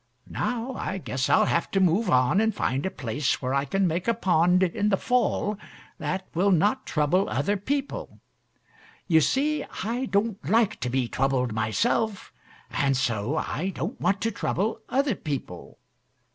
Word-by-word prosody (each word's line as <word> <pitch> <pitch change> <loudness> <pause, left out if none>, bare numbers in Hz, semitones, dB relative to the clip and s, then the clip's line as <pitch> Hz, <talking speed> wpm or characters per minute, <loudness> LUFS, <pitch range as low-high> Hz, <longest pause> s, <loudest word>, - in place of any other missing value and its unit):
Now, 245 +1 -2
I 195 - -3
guess 130 -7 -2
I'll - - +5
have 170 - 0
to 195 - +1
move 190 +4 +2
on 130 +10 +3
and 220 -1 +1
find 135 0 -1
a - - -1
place 135 -2 -2
where 130 +1 -2
I 140 0 +1
can 195 +7 +1
make 175 +3 -1
a 230 - +3
pond 180 -3 +3
in 200 +4 +1
the 195 - +2
fall 230 -4 0 0.4
that 185 +5 -3
will 185 +4 +2
not 205 +9 +2
trouble 170 +5 +1
other 205 - 0
people. 275 +8 -3 0.9
You 160 -3 +5
see, 290 - +1 0.2
I 240 +5 -2
don't 200 0 0
like 220 0 +2
to 125 - -2
be 125 -1 0
troubled 130 -1 0
myself, 195 - 0 0.4
and 135 -2 +1
so 115 -4 -1
I 180 +7 -2
don't 185 +9 -4
want 190 +3 +1
to 225 - 0
trouble 215 +1 -2
other 275 -1 +1
people. 140 - -6
185 Hz, 165 wpm, -26 LUFS, 140-220 Hz, 0.9 s, I'll